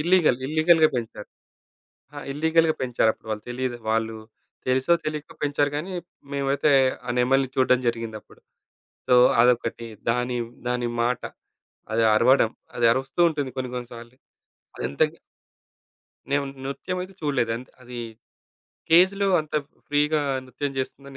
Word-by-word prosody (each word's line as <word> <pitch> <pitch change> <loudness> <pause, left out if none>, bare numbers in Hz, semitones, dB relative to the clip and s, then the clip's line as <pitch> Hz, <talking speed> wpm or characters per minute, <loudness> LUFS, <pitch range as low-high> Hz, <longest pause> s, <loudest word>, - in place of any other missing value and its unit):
Illegal. 170 -5 +3
Illegal 160 +2 +4 0.2
పెంచారు. 120 - -5 0.9
ఆ! - - -8
Illegal 160 +3 +2
పెంచారుప్పుడు 115 -3 0
వాళ్ళు 105 0 -4
తెలీదు 125 0 -3
వాళ్ళు 110 0 0 0.5
తెలుసో 130 +6 +3
తెలీకో 150 -1 -4
పెంచారు 145 0 +1
గానీ 175 +6 -5 0.4
మేమైతే 140 +2 +1 0.4
ఆ - - -3
నెమలిని 135 +1 +2
చూడడం 130 -1 +3
జరిగిందప్పుడు. 115 -2 -4 0.7
సో, 125 - +4 0.3
అదొకటి 120 -1 +1 0.2
దాని, 125 +1 0 0.3
దాని 125 -1 0 0.2
మాట. 125 0 0 0.7
అది 115 +1 +2
అరవడం 120 0 +4 0.3
అది 120 - 0
అరుస్తూ 135 +5 -3
ఉంటుంది 145 -4 -3
కొన్ని 130 -1 -3
కొన్ని 125 -1 -5
సార్లు. 120 +1 -11 0.6
అదెంతకి 70 - -1 1.1
నేను 140 0 +2 0.2
నృత్యం 180 +7 -4
అయితే 190 +1 -10
చూడలేదు 130 -6 0
అంత్ 125 - -11
అది 125 0 -8 0.9
కేజ్‌లో 190 +4 +5
అంత 155 0 -10 0.3
ఫ్రీగా 150 +1 +2 0.3
నృత్యం 140 +2 -4
చేస్తుందని 135 +1 -6
130 Hz, 120 wpm, -24 LUFS, 120-150 Hz, 1.1 s, కేజ్‌లో